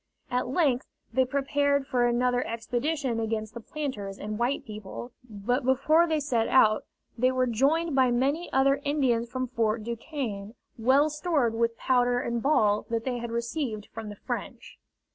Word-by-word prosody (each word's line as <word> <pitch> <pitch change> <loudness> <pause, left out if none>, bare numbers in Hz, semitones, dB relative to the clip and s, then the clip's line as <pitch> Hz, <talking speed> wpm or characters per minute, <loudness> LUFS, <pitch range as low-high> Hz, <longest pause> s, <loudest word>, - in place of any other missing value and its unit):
At 250 0 0
length 270 -3 +1 0.3
they 260 +2 +3
prepared 280 +1 +1
for 245 -2 +2
another 245 +1 +1
expedition 240 +3 -2
against 220 -1 -2
the 235 - -6
planters 220 -7 -5
and 210 +1 -5
white 245 +4 0
people, 215 +3 -8 0.2
but 230 +6 -1
before 305 +6 +4
they 315 -2 +1
set 245 -6 0
out 215 -4 +4 0.3
they 255 +2 +2
were 255 0 +1
joined 280 +8 +1
by 260 -2 +4
many 275 +8 0
other 275 +1 +3
Indians 255 -5 +1
from 255 0 -2
Fort 225 -2 0
Duquesne, 230 -3 -5 0.2
well 270 +6 +3
stored 300 -6 +1
with 230 0 0
powder 245 -1 +2
and 235 -2 -2
ball 215 -7 +2
that 230 -1 -1
they 245 -1 -2
had 235 0 -5
received 235 -2 -3
from 220 -1 -6
the 205 - -7
French. - - -6
245 Hz, 160 wpm, -27 LUFS, 225-275 Hz, 0.3 s, before